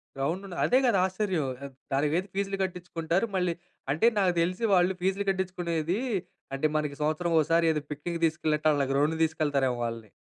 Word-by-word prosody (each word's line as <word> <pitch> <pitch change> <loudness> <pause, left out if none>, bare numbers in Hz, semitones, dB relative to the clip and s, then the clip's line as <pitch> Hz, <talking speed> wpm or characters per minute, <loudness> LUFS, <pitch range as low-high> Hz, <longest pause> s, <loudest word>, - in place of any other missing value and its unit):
గ్రౌండుండదు, 175 +7 -3
అదే 255 - +4
కదా 230 -6 +3
ఆశ్చర్యం! 190 -6 -1 0.2
ఆ! - - -4 0.3
దానికి 145 +2 +2
వేరే 185 +3 0
ఫీస్‌లు 195 0 -1
కట్టించుకుంటారు. 175 +1 -1
మళ్ళీ 180 -2 +1 0.4
అంటే, 160 +10 +2
నాకు 185 -2 +3
తెలిసి 185 +6 -1
వాళ్ళు 180 +1 +3
ఫీస్‌లు 195 +2 0
కట్టించుకునేది 175 -1 -2 0.6
అంటే 155 +3 +1
మనకి 150 -2 -1
సంవత్సరం 155 +3 0
ఓసారి 165 +2 +3
ఏదో 150 -1 -1
పిక్నిక్ 170 +4 -4
తీసుకెళ్ళినట్టు 155 -1 +1
వాళ్ళ 145 -1 +1
గ్రౌండ్‌కి 150 +4 +1
తీసుకెళ్తారేమో 140 -5 0
వాళ్ళని. 115 -2 -5
170 Hz, 160 wpm, -28 LUFS, 150-185 Hz, 0.6 s, అదే